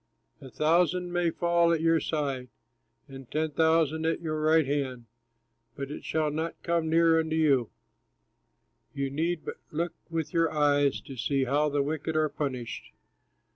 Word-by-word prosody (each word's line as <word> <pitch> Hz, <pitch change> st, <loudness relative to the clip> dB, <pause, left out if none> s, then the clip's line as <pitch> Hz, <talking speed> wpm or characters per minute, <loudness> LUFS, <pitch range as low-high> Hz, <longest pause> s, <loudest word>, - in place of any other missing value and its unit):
A 135 Hz, -, -10 dB
thousand 175 Hz, +5 st, +1 dB
may 175 Hz, -1 st, +2 dB
fall 170 Hz, 0 st, +2 dB
at 165 Hz, -, +2 dB
your 165 Hz, 0 st, +3 dB
side, 140 Hz, -6 st, -2 dB, 0.6 s
And 135 Hz, -2 st, -11 dB
ten 155 Hz, 0 st, -1 dB
thousand 160 Hz, 0 st, +2 dB
at 165 Hz, -, 0 dB
your 155 Hz, -2 st, -3 dB
right 155 Hz, 0 st, +4 dB
hand, 135 Hz, -4 st, -2 dB, 0.7 s
But 140 Hz, 0 st, -5 dB
it -, -, -7 dB
shall 155 Hz, -1 st, 0 dB
not 160 Hz, +2 st, -3 dB
come 170 Hz, -2 st, 0 dB
near 165 Hz, 0 st, +4 dB
unto 160 Hz, 0 st, -1 dB
you. 140 Hz, -7 st, +3 dB, 1.3 s
You 140 Hz, -1 st, -2 dB
need 160 Hz, +3 st, -1 dB
but -, -, -5 dB
look 170 Hz, +2 st, -2 dB, 0.2 s
with 165 Hz, -2 st, -3 dB
your 165 Hz, -1 st, +2 dB
eyes, 145 Hz, -2 st, +2 dB
To 135 Hz, -, -10 dB
see 135 Hz, +2 st, 0 dB
how 145 Hz, +4 st, +1 dB
the 145 Hz, -1 st, +1 dB
wicked 155 Hz, +2 st, -3 dB
are 155 Hz, -1 st, +2 dB
punished. 130 Hz, -6 st, -4 dB
155 Hz, 160 wpm, -28 LUFS, 140-165 Hz, 1.3 s, right